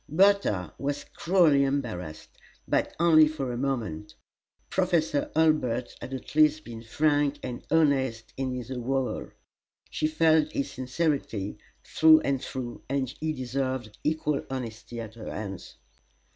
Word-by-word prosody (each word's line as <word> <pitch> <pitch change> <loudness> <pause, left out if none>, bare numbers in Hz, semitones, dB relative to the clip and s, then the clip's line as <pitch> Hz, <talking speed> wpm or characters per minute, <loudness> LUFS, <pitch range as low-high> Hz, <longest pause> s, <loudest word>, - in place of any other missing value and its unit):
Bertha 165 - +3
was 145 +1 -2
cruelly 165 -6 +3
embarrassed, 110 - -3 0.4
but - - 0
only 160 -2 +6
for 145 -5 -3
a - - -3
moment. 120 - -3 0.6
Professor 170 -6 +1
Hurlbut 150 -7 +2
had - - -7
at 130 -1 -7
least 155 0 +4
been 115 -1 -8
frank 145 +4 +1
and 125 -1 -5
honest 135 -7 +1
in 130 -1 -2
his 125 0 -5
avowal 130 +1 -2 0.6
she 155 - 0
felt 155 -1 +3
his 140 0 -2
sincerity 130 - -2 0.3
through 160 0 +6
and 135 -3 -1
through 120 -4 -6
and 135 -2 0
he 160 0 0
deserved 130 -4 -3
equal 150 -2 0
honesty 120 -2 -6
at 110 -1 -7
her 115 -1 -8
hands. 100 -4 -7
135 Hz, 130 wpm, -27 LUFS, 120-155 Hz, 0.6 s, only